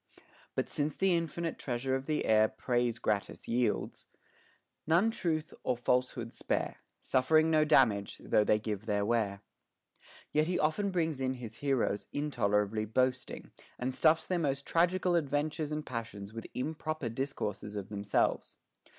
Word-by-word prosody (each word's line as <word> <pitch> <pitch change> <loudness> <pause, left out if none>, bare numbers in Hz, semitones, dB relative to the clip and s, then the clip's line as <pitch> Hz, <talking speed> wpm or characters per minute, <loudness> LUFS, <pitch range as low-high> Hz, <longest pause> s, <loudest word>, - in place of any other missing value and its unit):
But - - 0
since 145 0 -1
the 190 -2 +3
infinite 165 0 -2
treasure 130 +1 -2
of 135 0 -2
the 155 -1 0
air 110 0 +5
Praise 120 0 -1
gratis 100 -7 -2
yields, 120 -2 -1 0.8
none 175 +8 +4
truth 160 -7 -2
or 125 - 0
falsehood 125 -1 0
spare; - - -2 0.2
Suffering 155 +5 +3
no 155 -1 +5
damage, 115 -10 +3
though 105 - +2
they 105 - +3
give 105 0 -4
their 105 -1 +1
ware. 105 -3 0 0.9
Yet 155 +1 +2
he 180 - 0
often 180 +7 +1
brings 165 -6 -1
in 130 0 0
his 115 -3 -8
heroes 130 -7 0
intolerably 110 -7 0
boasting, 125 +3 -1 0.3
and 130 +1 -2
stuffs 160 +3 +3
their 180 -2 0
most 140 -3 -1
tragical 180 +2 +2
adventures 150 -1 0
and 150 0 -3
passions 110 -4 -6
with 115 0 -7
im 150 +5 -2
proper 155 -4 -3
discourses 110 -5 -3
of 100 -1 -5
themselves. 100 -1 0
130 Hz, 150 wpm, -32 LUFS, 110-155 Hz, 0.9 s, air